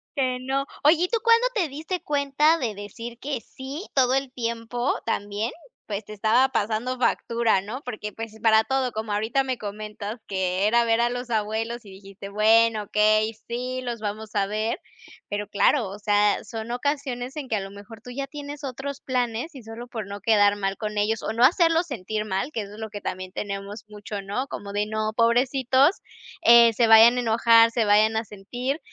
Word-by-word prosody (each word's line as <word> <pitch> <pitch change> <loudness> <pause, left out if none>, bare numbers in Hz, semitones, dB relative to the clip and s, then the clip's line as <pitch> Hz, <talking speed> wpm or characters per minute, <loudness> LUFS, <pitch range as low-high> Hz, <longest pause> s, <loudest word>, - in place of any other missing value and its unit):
Que 255 -3 0
no. 270 +2 -1 0.2
Oye, 315 +4 +5
¿y - - +2
tú 460 +4 0
cuándo 465 +1 +5
te 385 -9 +1
diste 320 +5 -4
cuenta 295 +2 +2
de 235 -8 -2
decir 230 +4 -8
que 270 -2 -4
sí, 270 - -8
todo 255 -2 +3
el 270 -1 -1
tiempo 235 +1 -2
también, 205 +1 -2 0.3
pues, 205 -1 -5
te 215 - -9
estaba 225 +6 +3
pasando 230 +2 -1
factura?, 230 -4 +1
¿no? 230 +8 -7
Porque, 215 -4 -6
pues 225 -1 -7
para 220 -1 +5
todo, 265 0 0
como 220 -1 -4
ahorita 225 +6 +1
me 260 -2 -2
comentas 210 +1 -6
que 190 0 0
era 235 +1 +3
ver 230 0 +2
a 240 - +2
los 245 0 -5
abuelos 225 +2 -2
y 205 - -14
dijiste: 195 +1 -11
"Bueno, 220 +1 +4
okey, 215 +2 +2
sí, 250 +2 -3
los 240 -2 -4
vamos 215 0 -5
a 200 - +2
ver", 215 +3 -2 0.5
pero 205 0 -3
claro, 210 +3 +2
o 195 - -8
sea, 205 -1 +2
son 225 0 -7
ocasiones 260 0 -2
en 280 - -5
que 220 - +1
a - - 0
lo 195 0 -7
mejor 205 +3 -12
tú 250 - -9
ya 275 +2 -4
tienes 290 +1 -8
otros 275 +1 -5
planes, 250 +4 -2
y 255 - -10
solo 225 +2 -9
por 220 -4 -5
no 200 0 -8
quedar 205 -2 +4
mal 195 -1 -2
con 210 -1 -4
ellos 215 +1 0
o - - -2
no 235 +2 +2
hacerlos 335 +3 +4
sentir 215 - -3
mal, 195 +7 -2
que 225 - -3
eso 200 0 -9
es 220 - -12
lo 220 - -5
que 205 -1 -7
también 185 -1 -5
tenemos 200 +1 -6
mucho, 210 -1 -7
¿no?, 200 +7 -3
como 200 -6 -7
de 205 0 0
no, 215 0 -2
pobrecitos, 260 - +3 0.5
eh, 235 -4 +8
se 235 +1 +3
vayan 225 +2 +8
a - - +1
enojar, 230 0 +5
se 230 -2 +1
vayan 215 +2 +4
a 220 +1 -1
sentir, 245 +9 -4
230 Hz, 200 wpm, -25 LUFS, 210-255 Hz, 0.5 s, eh